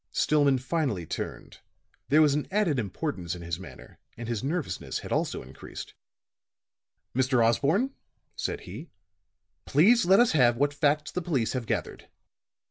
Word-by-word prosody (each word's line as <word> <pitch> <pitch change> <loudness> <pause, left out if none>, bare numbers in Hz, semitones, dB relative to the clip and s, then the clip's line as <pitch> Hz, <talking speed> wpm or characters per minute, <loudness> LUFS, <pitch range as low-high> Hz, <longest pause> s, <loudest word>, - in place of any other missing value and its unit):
Stillman 145 -3 +3
finally 130 - -1
turned; - - -6 0.5
there 155 +2 +6
was 145 -2 +4
an 150 0 -1
added 190 -9 +1
importance 100 - -3
in 85 - -9
his 85 0 -4
manner, 95 - -12 0.2
and 120 0 -6
his 115 -1 -2
nervousness 145 - -3
had - - -8
also - - -1
increased. 65 +1 -10 1.2
"Mr. 130 -2 +3
Osborne," 160 - +2 0.4
said - - -3
he, - - -9 0.8
"please 215 - +5
let 190 +4 +5
us 240 -1 +5
have 120 -5 +4
what 145 +2 +1
facts 150 +1 +1
the 180 - -2
police 140 -10 0
have 125 -4 -3
gathered." - - -3
140 Hz, 145 wpm, -27 LUFS, 115-155 Hz, 1.2 s, there